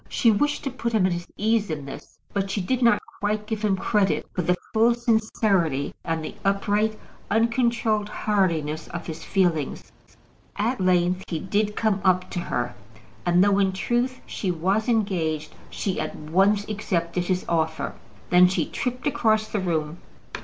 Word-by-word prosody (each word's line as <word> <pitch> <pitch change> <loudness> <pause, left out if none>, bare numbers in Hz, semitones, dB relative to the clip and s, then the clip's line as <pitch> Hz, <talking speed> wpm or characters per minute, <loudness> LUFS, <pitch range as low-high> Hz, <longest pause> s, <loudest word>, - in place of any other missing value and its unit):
She 230 - +4
wished 290 +8 0
to 275 - -2
put 235 -2 -3
him 210 -4 +3
at 185 - +2
his 175 0 -5
ease 220 -1 +1
in 150 -3 -4
this; 135 - -10 0.2
but 195 -1 -1
she 195 - -1
did 245 +7 -1
not 235 -4 +5 0.2
quite 210 +1 -1
give 215 -1 -3
him 205 -2 +3
credit 200 0 +1
for 180 - -1
the 180 +1 +1 0.2
full 230 +2 +4
sincerity, 215 - +1
and 165 -1 -2
the - - -6
upright, 205 +2 +1 0.3
uncontrolled 225 -1 +1
heartiness 165 -9 0
of 175 -1 -6
his 160 -1 -6
feelings. 175 -7 0 0.6
At 225 +2 -1
length 180 0 +2
he 165 - -2
did 205 +5 -1
come 210 -3 +1
up 185 -1 +2
to 180 - -2
her, 120 -7 -2 0.5
and 175 +1 +5
though, 200 0 +3
in 190 -1 +2
truth, 240 +6 -1
she 190 - -3
was 190 +7 0
engaged, 165 -9 0 0.2
she 190 -3 -2
at - - -3
once 195 +7 +2
accepted 180 -4 -1
his 185 0 -1
offer. 160 -1 -1 0.4
Then 180 0 +7
she 185 - 0
tripped 250 0 -4
across 220 -6 +2
the 210 - -1
room. 165 -3 -2
195 Hz, 165 wpm, -25 LUFS, 175-220 Hz, 0.6 s, Then